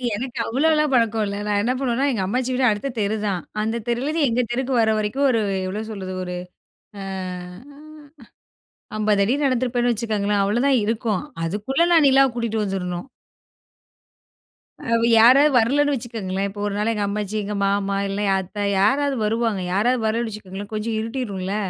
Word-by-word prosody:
எனக்கு 245 +1 -5
அவ்வளோலாம் 300 +3 +2
பழக்கம் 225 -3 +2
இல்ல, 200 0 -4
நான் 205 -1 +1
என்ன 240 +4 0
பண்ணுவேன்னா 265 +1 0
எங்க 220 -6 -1
அம்மாச்சி 255 +5 -1
வீடு 255 0 +1
அடுத்த 210 +7 -3
தெரு 205 +1 0
தான். 185 -3 -1 0.2
அந்த 225 +2 -1
தெருலேருந்து 285 +6 0
எங்க 240 +2 +1
தெருக்கு 260 +2 -1
வர, 220 - +2
வரைக்கும் 215 +7 0
ஒரு 230 -3 +2 0.3
எவ்வளோ 200 +3 -3
சொல்றது 190 -2 -6
ஒரு 180 0 -5 0.7
அ - - -6 2.0
50 210 -2 +2
அடி 240 - +1
நடந்திருப்பேன்னு 245 -1 +1
வச்சுக்கோங்களேன் 210 -3 0
அவ்வளோதான் 240 +5 +2
இருக்கும். 220 -3 -1 0.2
அதுக்குள்ள 215 - 0
நான் 320 -3 +6
நிலாவ 270 0 +5
கூட்டிட்டு 225 -2 -1
வந்துடணும். 180 +2 -3 1.9
அவ - - +5 0.2
யாராவது 275 +6 +7
வரலன்னு 285 +5 +3
வச்சுக்கோங்களேன். 200 -6 -3
இப்ப 205 +1 -10
ஒரு 200 - -3
நாள் 215 +2 +1
எங்க 210 -2 -1
அம்மாச்சி, 210 0 -3
எங்க 210 +1 -4
மாமா 200 0 0
இல்ல, 200 +1 -3 0.2
அத்தை 205 +2 -5 0.2
யாராவது 275 +7 +2
வருவாங்க. 225 -2 0
யாராவது 235 +4 +1
வரலைன்னு 230 +1 0
வச்சுக்கோங்களேன் 205 0 -8
கொஞ்சம் 220 +1 -2
இருட்டிடும்ல 210 -5 -3
225 Hz, 150 wpm, -22 LUFS, 205-255 Hz, 2.0 s, யாராவது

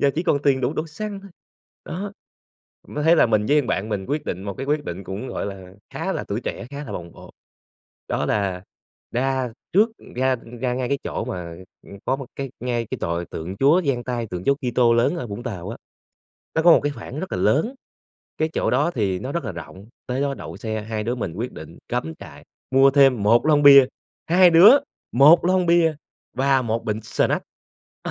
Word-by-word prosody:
giờ 140 - +4
chỉ 165 - -1
còn 145 - +2
tiền 135 -2 +2
đủ 125 +3 0
đổ 155 - -2
xăng 200 +5 -6
thôi, 200 0 -13 0.5
đó. 195 +4 -5 0.8
Mới 150 0 -4
thấy 165 +1 +5
là - - +5
mình 110 -2 +1
với 150 +4 +4
thằng 130 - -7
bạn 100 +4 -1
mình 100 -3 -3
quyết 150 +2 -2
định 90 - -4
một 100 -1 -5
cái 135 - -6
quyết 150 +1 0
định 90 +3 -6
cũng, 100 +7 -6
gọi - - -4
là, 95 -2 -9 0.2
khá - - -3
là - - -3
tuổi - - -2
trẻ, - - -5
khá 145 +1 -6
là - - -7
bồng 85 -1 -7
bột, - - -14 0.8
đó - - -1
là 95 -3 -1 0.5
ra 130 -1 -1 0.2
trước 210 +5 +5 0.3
ra 130 0 +2 0.2
ra 125 -1 0
ngay 125 -1 -2
cái 140 - 0
chỗ - - -3
mà, 85 -2 -6 0.3
ừm, 100 - -11
có 130 - +1
một 135 -1 -8
cái 135 -1 -4
ngay 120 -2 -2
cái - - -3
tòa 85 +1 -2
tượng 85 +4 -6
Chúa 145 - +4
dang 125 -4 -1
tay, 120 -2 -3
tượng 90 -3 -6
Chúa 140 - +4 0.2
Kitô 120 -1 +3
lớn 120 +9 +2
ở 145 - -4
Vũng 105 +2 -7
Tàu 95 -7 -6
á, 115 - -6 0.8
nó 160 - +3
có 175 - +8
một - - +6
cái 145 - 0
khoảng 130 +2 -8
rất 190 - -5
là - - -1
lớn, 150 - +1 0.6
cái 155 - +1
chỗ - - 0
đó 145 +7 +2
thì 100 - -1
nó 130 +8 -5
rất 170 -2 -2
là 110 - -4
rộng, 90 +4 -10 0.2
tới 125 +1 -2
đó 140 -1 0
đậu - - -9
xe, 110 -2 -4
hai 110 0 -4
đứa 120 +3 -1
mình 115 -9 -4
quyết 115 +6 -4
định - - -11
cắm 80 0 -3
trại, - - -12 0.3
mua 135 +1 +6
thêm 135 -5 +4
1 115 +6 +4
lon 150 -2 +4
bia, 140 -2 +9 0.4
2 180 +1 +6
đứa 185 +11 +8 0.3
1 150 +7 +6
lon 185 0 +2
bia 170 -2 +4 0.4
và 135 0 +3
1 115 -1 -2
bịch 110 0 -3
snack, - - 0 0.6
ừ. - - -4
130 Hz, 225 wpm, -22 LUFS, 105-150 Hz, 0.8 s, bia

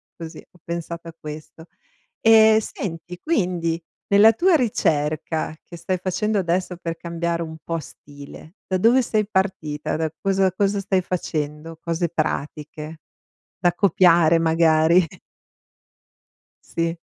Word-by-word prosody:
così, 165 -2 -9
ho 180 - -24
pensato 170 0 -6
a 165 - -10
questo. 155 +2 -9 0.6
Ehm, 220 -1 +7
senti, 180 -4 -6
quindi, 175 - -1 0.3
nella 205 +3 +7
tua 360 +6 +3
ricerca 155 - -1
che 170 - -11
stai 185 +2 -2
facendo 205 +3 -1
adesso 180 0 -1
per 165 -1 -5
cambiare 170 0 -3
un 160 -1 -7
po' 165 0 -2
stile, 145 +5 -13
da 185 - -1
dove 235 +6 +5
sei 215 -3 0
partita? 170 -8 -1
Da 160 -1 -1
cosa 195 -1 +1
cosa 200 +1 0
stai 190 -1 +1
facendo? 160 -2 -4
Cose 170 +1 -1
pratiche, 155 0 -4 0.6
da 175 -2 +3
copiare 170 -4 +4
magari. 165 +1 +4 1.6
Sì. 165 0 -2
170 Hz, 125 wpm, -22 LUFS, 160-190 Hz, 1.6 s, Ehm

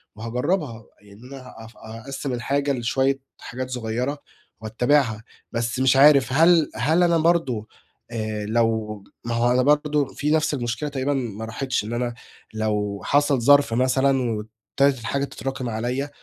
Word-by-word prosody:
وهاجرّبها، 120 - -2 0.2
يعني 100 0 -17
أنا 130 -1 -11
هاف 115 +1 -13
هأقسّم 130 +5 -6
الحاجة 140 +3 -1
لشوية 135 +3 0 0.2
حاجات 130 +2 -6
صغيّرة، 125 +3 -3 0.4
وأتّبعها، 115 0 +1 0.3
بس 120 +1 -2
مش 130 0 +4
عارف 140 -1 +6
هل 165 +1 +5
هل 160 +8 +2
أنا 170 -1 +3
برضه، 155 -10 +1 0.4
آآ 110 -2 -3
لو 110 -2 -1 0.2
ما 120 0 -2
هو 120 +1 +2
أنا 125 +1 +3
برضه 150 +1 +2
في 150 +3 -3
نفْس 155 -1 +2
المشكلة 125 +2 -3
تقريبًا 140 0 -1
ما 115 -5 -4
راحتش، 125 +2 -2
إن 110 +3 -5
أنا 120 0 -2 0.4
لو 105 -2 -2
حصل 145 -2 +2
ظرف 140 -1 +5
مثلًا 130 +2 +2
وابتدت 110 +5 -1
الحاجة 140 +5 -2
تتراكم 135 -2 -5
عليَّ، 125 +5 -2
125 Hz, 145 wpm, -23 LUFS, 115-140 Hz, 0.4 s, عارف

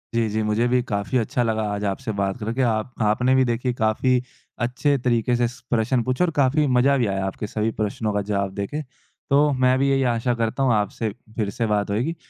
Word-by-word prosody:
जी, 115 -1 +2
जी, 110 +1 -1
मुझे 105 +3 +1
भी 125 0 +2
काफ़ी 100 +4 -1
अच्छा 120 +1 0
लगा 110 -1 0
आज 100 0 -4
आपसे 100 +3 -2
बात 95 -1 -1
करके, 115 +4 -2
आप 115 -1 0
आपने 110 +5 +2
भी 130 - +4
देखिए 125 +1 -1
काफ़ी 120 +3 +1 0.4
अच्छे 140 +4 +1
तरीक़े 120 -1 +1
से 120 0 +2
स 125 - -10
प्रश्न 120 +1 +1
पूछा 130 +8 +1
और 170 - -1
काफ़ी 145 +2 +3
मज़ा 130 +2 +3
भी 120 -4 +1
आया 95 -1 -1
आपके 95 +2 -4
सभी 110 +1 -1
प्रश्नों 105 +1 -1
का 105 - 0
जवाब 100 -1 -2
देके। 100 +10 -3 0.5
तो 145 +2 +4
मैं 130 0 +3
भी 140 +1 +2
यही 135 -1 +2
आशा 115 +2 0
करता 115 +3 -1
हूँ 130 -3 +3
आपसे 105 +1 -1 0.3
फ़िर 105 -3 -1
से 115 +3 -2
बात 105 -1 0
होएगी, 125 +11 -1
115 Hz, 220 wpm, -23 LUFS, 105-130 Hz, 0.5 s, भी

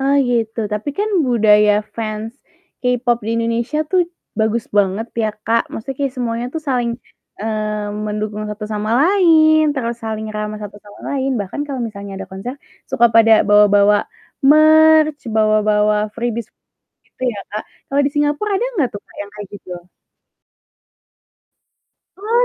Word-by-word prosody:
Ah, 275 +1 +2
iya 245 -2 0
itu, 225 +1 -7
tapi 210 +7 -3
kan 420 +1 +1 0.2
budaya 210 -3 +4 0.2
fans, 220 0 -4 0.5
K-pop 245 -1 +1
di - - -1
Indonesia 230 +5 -1
tuh 370 - +3 0.4
bagus 220 +1 0
banget 200 +3 +1 0.2
ya, 220 - +1 0.2
Kak, 230 +1 +2
maksudnya 265 +4 -6
kayak 275 -2 -1
semuanya 235 -1 -2
tuh 320 - -3
saling, 245 -3 0 0.5
eee, 215 -1 -2 0.2
mendukung 210 0 -3
satu 210 0 -6
sama 210 +1 -2
lain 320 -3 +5
terus 235 -4 -3
saling 220 -1 -4
ramah 210 0 -4
satu 205 -1 -8
sama 205 0 -15
lain, 270 -1 -1
bahkan 200 +7 -5
kalau 270 -3 -4
misalnya 200 -2 -8
ada - - -7
konser, 195 +7 -6 0.4
suka 235 - +4
pada 225 0 +6 0.2
bawa-bawa 205 0 +5 0.5
merch 310 0 +5 0.2
bawa-bawa 215 -1 +3 0.2
freebies 235 -1 -3 0.6
gitu - - -17
ya, 205 - -8
Kak, 210 - -3 0.3
kalau 280 +1 +1
di - - 0
Singapora 295 +6 0
ada 425 - 0
nggak 295 - +1
tuh 205 - -6
Kak - - -21
yang 205 - -7
kayak 205 -2 -8
gitu? 185 -2 -10 2.5
Oh, 460 +4 +1
230 Hz, 150 wpm, -18 LUFS, 210-275 Hz, 2.5 s, pada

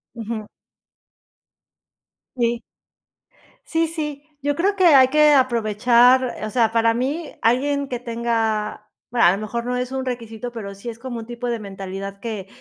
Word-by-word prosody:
Ujú. 225 -1 -5 1.9
Sí. 235 -1 0 1.0
Sí 330 0 +1
sí, 300 -3 -5 0.2
yo 290 +1 0
creo 390 +5 +1
que 375 -2 +3
hay 270 -5 +7
que 300 +2 +5
aprovechar, 245 0 +4
o 215 - -2
sea, 225 -1 +2
para 230 0 +3
mí 285 +7 -3
alguien 280 +4 +1
que 245 -2 -4
tenga, 225 -3 -2 0.2
a 230 -8 +5
lo 190 - -1
mejor 235 +3 -4
no 250 0 -1
es 250 +1 -3
un 265 0 -2
requisito, 240 -1 -5
pero 205 -4 -7
sí 200 +5 -7
es 230 0 -8
como 240 -1 -5
un 225 - -7
tipo 240 +1 -5
de 235 -1 -1
mentalidad 195 -1 -7
que 210 -3 -5
235 Hz, 155 wpm, -22 LUFS, 220-260 Hz, 1.9 s, hay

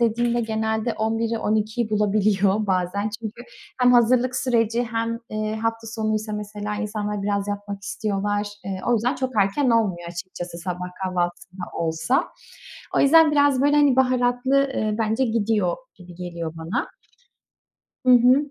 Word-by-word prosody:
dediğimde 235 +1 +1
genelde 220 0 -1
11'i 225 +1 -1
12'yi 215 +1 -1
bulabiliyor 210 -1 +2
bazen. 190 +2 0
Çünkü 230 +2 -7 0.4
hem 250 0 +6
hazırlık 245 +1 +3
süreci 235 -2 +1
hem, 230 0 -2
eee, 215 0 -2
hafta 225 0 -2
sonuysa 215 -1 -2
mesela 210 0 -4
insanlar 210 -1 -3
biraz 200 0 -1
yatmak 205 -1 -5
istiyorlar. 205 +1 -2 0.2
Eee, 190 -1 -4
o 245 - +3
yüzden 235 +3 +1
çok 260 0 -2
erken 245 +7 +1
olmuyor 190 -7 +1
açıkçası 175 0 -7
sabah 180 0 -4 0.2
kahvaltısı 180 -1 -2
da 185 -1 -6
olsa. 165 +10 0 0.7
O - - +4
yüzden, 315 +2 +6
biraz 285 -2 +3
böyle, 290 +1 +4
hani, 285 -3 +4
baharatlı, 255 +1 +2 0.2
eee, 215 -1 0
bence 225 +3 +1
gidiyor 215 -5 0 0.2
gibi 180 -1 -14
geliyor 170 -2 -5
bana. 160 +2 -2 1.2
Hı 250 - +7
hı. 255 +4 +5
215 Hz, 145 wpm, -23 LUFS, 195-240 Hz, 1.2 s, Hı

